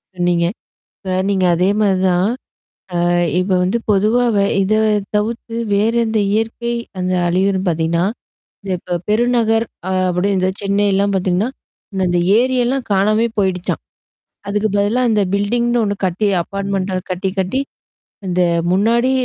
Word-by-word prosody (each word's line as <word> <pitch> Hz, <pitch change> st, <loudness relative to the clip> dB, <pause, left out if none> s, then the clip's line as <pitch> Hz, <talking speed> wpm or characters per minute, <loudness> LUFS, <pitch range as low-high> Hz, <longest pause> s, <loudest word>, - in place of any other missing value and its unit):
சொன்னீங்க. 175 Hz, -1 st, +1 dB, 0.5 s
இப்ப 190 Hz, -2 st, -5 dB, 0.2 s
நீங்க 195 Hz, -2 st, +1 dB
அதே 180 Hz, +3 st, +2 dB
மாரி 195 Hz, -3 st, +3 dB
தான். 180 Hz, +1 st, +2 dB, 0.8 s
அ -, -, +2 dB, 0.3 s
இப்ப 185 Hz, +1 st, -1 dB
வந்து 185 Hz, +6 st, +1 dB
பொதுவாவ 220 Hz, +3 st, +2 dB, 0.3 s
இத 195 Hz, +2 st, +1 dB, 0.4 s
தவிர்த்து 225 Hz, +2 st, -2 dB, 0.2 s
வேறந்த 225 Hz, +2 st, +1 dB
இயற்கை 225 Hz, +2 st, -1 dB, 0.3 s
அந்த 185 Hz, 0 st, -1 dB
அலியரும்ன்ன 190 Hz, +2 st, +1 dB
பார்த்தீங்கன்னா, 170 Hz, 0 st, +1 dB, 0.6 s
த -, -, -8 dB
இப்ப 175 Hz, 0 st, -3 dB
பெருநகர் 225 Hz, 0 st, +2 dB, 0.2 s
அ -, -, -1 dB, 0.2 s
அப்டி 180 Hz, +3 st, 0 dB
இந்த 185 Hz, 0 st, +1 dB
செனைல்லாம் 200 Hz, 0 st, +1 dB
பார்த்தீங்கன்னா. 185 Hz, +4 st, 0 dB, 0.4 s
முன்ன 190 Hz, -1 st, 0 dB
அந்த 175 Hz, 0 st, +1 dB, 0.2 s
ஏரியெல்லாம் 255 Hz, 0 st, 0 dB
காணாமே 215 Hz, +4 st, +2 dB
போயிடுச்சான். 185 Hz, -2 st, -1 dB, 0.7 s
அதுக்கு 210 Hz, +1 st, 0 dB
பதிலா 210 Hz, +5 st, +1 dB
இந்த 210 Hz, -1 st, +2 dB
பில்டிங்னு 235 Hz, +4 st, +1 dB
ஒண்ணு 205 Hz, -1 st, -1 dB
கட்டி 190 Hz, +4 st, 0 dB, 0.2 s
அப்பார்ட்மென்ண்ட்ட 195 Hz, -1 st, -2 dB
கட்டி 185 Hz, +1 st, -2 dB
கட்டி. 190 Hz, +8 st, 0 dB, 0.7 s
இந்த 180 Hz, 0 st, +1 dB, 0.3 s
முன்னாடி 235 Hz, +7 st, +2 dB
200 Hz, 130 wpm, -18 LUFS, 185-225 Hz, 0.8 s, மாரி